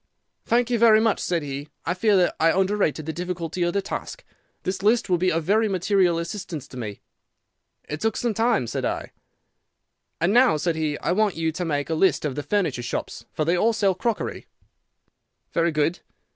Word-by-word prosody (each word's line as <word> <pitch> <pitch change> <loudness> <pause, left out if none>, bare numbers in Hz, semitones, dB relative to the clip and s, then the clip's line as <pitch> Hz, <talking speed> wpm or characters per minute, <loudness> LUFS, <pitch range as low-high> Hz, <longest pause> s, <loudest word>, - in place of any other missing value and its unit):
"'Thank 240 +1 +2
you 235 - +2
very 220 -2 +7
much,' 220 -1 +2
said 170 -3 -1
he; 140 +1 -6 0.2
'I 165 - +1
fear 205 +2 +3
that 180 -1 +2
I 165 +1 +4
underrated 190 -6 0
the 160 - -3
difficulty 175 0 -4
of 175 0 +1
the 200 - 0
task. - - -6 0.4
This 185 0 -3
list 215 +1 +2
will 175 - +3
be 185 +1 +2
of 165 0 0
very 215 +5 +2
material 185 -2 +2
assistance 170 -4 -5
to - - -12
me.' 105 -4 -6 0.8
"'It 150 +1 -6
took 225 -1 0
some 235 -2 0
time,' 225 - +2
said - - -3
I. - - -3 1.1
"'And 170 +5 +2
now,' 245 -8 +5
said 165 +2 -1
he, 155 -2 -1
'I - - -2
want 205 +1 +2
you 160 0 0
to 175 +3 -4
make 145 -1 -2
a - - +2
list 175 0 +2
of 145 - -1
the 145 - -3
furniture 175 - -1
shops, 120 - -5
for 155 - -2
they 170 +3 +2
all 225 +6 +2
sell 200 -3 +2
crockery.' 225 +4 -3 1.1
"'Very 170 0 +2
good. 155 +3 0
180 Hz, 200 wpm, -24 LUFS, 160-210 Hz, 1.1 s, very